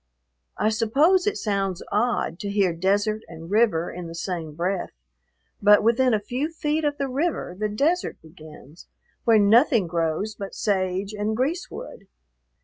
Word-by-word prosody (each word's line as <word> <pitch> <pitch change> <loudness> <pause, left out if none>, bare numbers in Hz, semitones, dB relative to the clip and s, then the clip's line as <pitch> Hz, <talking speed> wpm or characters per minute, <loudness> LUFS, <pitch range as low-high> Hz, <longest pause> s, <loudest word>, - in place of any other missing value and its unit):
I 215 - +2
suppose 290 - +3
it 420 - 0
sounds 195 -4 -2
odd 210 -6 0
to 205 - -4
hear 200 -3 +2
desert 205 +5 0
and 165 +1 -10
river 210 -6 +2
in 175 -1 -7
the 165 - -8
same 170 -3 -4
breath, 180 +3 -2 0.7
but 205 0 +6
within 250 +3 +3
a 215 - +2
few 250 +8 -3
feet 310 -1 -1
of 290 -1 0
the 275 - -1
river 275 - -2
the 210 +2 -2
desert 305 +12 0
begins, 155 -1 -15 0.4
where 230 -1 +6
nothing 225 - +4
grows 170 +5 -1
but 200 -1 -8
sage 190 0 -1
and 210 +1 -2
greasewood. 340 - -4
210 Hz, 150 wpm, -24 LUFS, 180-250 Hz, 0.7 s, but